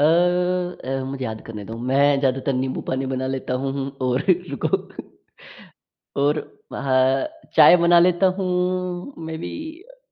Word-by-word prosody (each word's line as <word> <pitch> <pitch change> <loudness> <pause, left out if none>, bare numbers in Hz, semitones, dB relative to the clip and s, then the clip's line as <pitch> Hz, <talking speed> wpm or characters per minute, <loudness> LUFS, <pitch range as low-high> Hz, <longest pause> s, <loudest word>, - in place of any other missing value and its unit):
अ - - +4 0.8
अ, 135 0 -2
मुझे 135 -1 -5
याद 110 -1 -5
करने 105 -3 -7
दो। 110 +3 -7
मैं 140 +1 +4
ज़्यादातर 135 0 0
नींबू 130 0 -2
पानी 130 +1 -1
बना 130 0 -2
लेता 130 -1 -3
हूँ 135 - -1
हूँ 135 0 -3 0.2
और 125 +1 +1 0.3
रुको। 140 - -2 1.6
और 150 +1 +2 0.3
म - - -4
हाँ, 130 0 +2 0.3
चाय - - +9
बना 170 0 +5
लेता 180 +2 +4
हूँ। 180 +3 -2
मेबी 160 0 -5 0.4
अ - - -23
135 Hz, 150 wpm, -22 LUFS, 130-170 Hz, 1.6 s, चाय